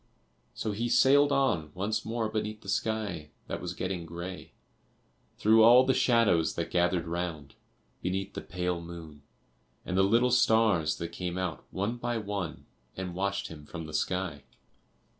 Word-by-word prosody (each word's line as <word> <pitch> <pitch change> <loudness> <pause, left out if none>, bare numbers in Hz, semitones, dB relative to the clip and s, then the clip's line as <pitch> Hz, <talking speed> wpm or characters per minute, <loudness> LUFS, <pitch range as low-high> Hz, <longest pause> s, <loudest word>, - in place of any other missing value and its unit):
So 110 - -2
he 115 +4 -2
sailed 145 +4 +5
on 130 - +1
once 105 +4 -1
more 115 0 -2
beneath 110 0 -3
the 95 - -9
sky 100 -7 -2 0.2
that - - -5
was - - -5
getting 90 -3 -3
grey, 85 +3 -7 0.8
through 110 +1 +5
all 120 +3 +8
the 130 - +3
shadows 110 - +3
that 85 0 -3
gathered 90 -1 +2
round, 85 -5 -4 0.5
beneath 95 +1 -2
the - - -5
pale 90 -1 -3
moon, 85 -3 -10 0.6
and 90 - -3
the 95 - +4
little 115 +6 +3
stars 110 -10 +3
that 85 - -4
came 90 0 -4
out 90 -3 -3
one 105 +6 -2
by 120 0 -2
one 100 -5 -4 0.3
and 95 -1 -4
watched 100 +2 -2
him 75 -2 -10
from 85 -2 -7
the 80 - -9
sky. 90 -2 -1
95 Hz, 160 wpm, -29 LUFS, 85-110 Hz, 0.8 s, all